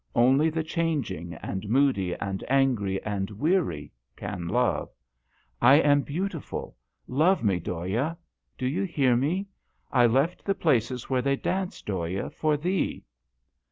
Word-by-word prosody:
Only 135 +6 +4
the 160 0 -2
changing, 150 - -2
and 95 +2 -4
moody, 115 -8 +2
and 95 -1 -4
angry, 125 -8 +2
and 100 -2 -2
weary 105 - 0 0.2
can 85 -1 -5
love. 120 +7 +1 0.7
I 130 +3 +8
am 145 -1 +5
beautiful; 170 +3 -4 0.3
love 160 +6 +2
me, 95 -5 +2
Dhoya. 95 - -2 0.4
Do 130 - -3
you 130 +5 0
hear 140 -10 +2
me? 160 +11 0 0.5
I 120 -1 +5
left 135 +9 +1
the 195 - 0
places 125 - +1
where 130 -1 +1
they 140 +2 +1
dance, 185 +6 -3
Dhoya, 95 -1 -3
for 155 -1 0
thee 180 +4 -1
130 Hz, 135 wpm, -27 LUFS, 100-160 Hz, 0.7 s, I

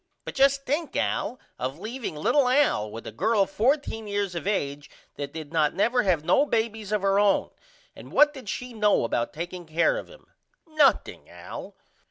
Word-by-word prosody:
But - - -6
just 275 0 +3
think 300 +4 -2
Al 255 - -1 0.2
of 130 +3 -3
leaveing 225 0 -5
little 255 - +2
Al 255 - +2
with 115 +2 -9
a - - -6
girl 205 - +2
14 225 +1 0
years 200 -2 -2
of 170 +2 -5
age 145 -8 -2 0.2
that 140 -1 -6
did 160 0 -8
not 155 -2 +2
never 240 +5 +2
have 175 -6 +1
no 180 - +4
babys 220 -5 -2
of 210 -2 0
her 195 0 +3
own! 205 -1 +2 0.4
And - - -12
what 295 0 +5
did 260 -8 -9
she 250 +2 -5
know 210 - +2
about 115 0 -1
taking 175 +2 -7
care 170 - +2
of - - -10
him? - - -17 0.4
Nothing 310 -4 +1
Al. - - -9
205 Hz, 185 wpm, -26 LUFS, 165-260 Hz, 0.4 s, what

